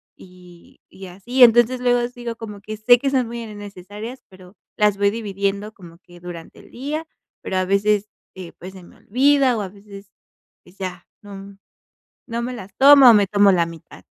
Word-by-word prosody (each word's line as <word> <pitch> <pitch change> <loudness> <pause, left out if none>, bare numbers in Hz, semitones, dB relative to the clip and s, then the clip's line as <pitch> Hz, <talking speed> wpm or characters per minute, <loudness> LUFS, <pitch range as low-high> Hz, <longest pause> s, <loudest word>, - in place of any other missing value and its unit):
y 180 -2 -18
y 190 0 -12
así. 240 +9 -4
Entonces, 240 +2 +5
luego 245 -1 +1
sigo 240 -1 -8
como 210 -3 -9
que 215 +1 -8
sé 245 +3 +5
que 275 - -1
son 255 -3 +1
muy 235 0 -7
innecesarias, 205 +3 -10
pero 185 +1 -17 0.2
las 210 -1 +2
voy 200 0 +3
dividiendo 200 -1 -4
como 170 -3 -15
que 175 -1 -18
durante 175 -2 -11
el - - -17
día, 300 +6 -5 0.3
pero 190 - -4
a 185 - 0
veces, 205 +2 0 0.3
eh, 180 -2 -10
pues, 185 +2 -10
se 185 -2 -13
me - - -18
olvida, 265 +1 +2
o - - -3
a 190 - -5
veces, 200 0 -14 0.5
pues, 190 - -21
ya, 185 -2 -7 0.2
no 200 -1 -11 0.7
no 235 0 -4
me 250 +1 -4
las 195 -4 -10
tomo, 275 -2 +8
o - - +8
me 205 -2 +3
tomo 200 0 +4
la 170 -2 +2
mitad. 165 -2 -13
205 Hz, 190 wpm, -20 LUFS, 190-240 Hz, 0.7 s, tomo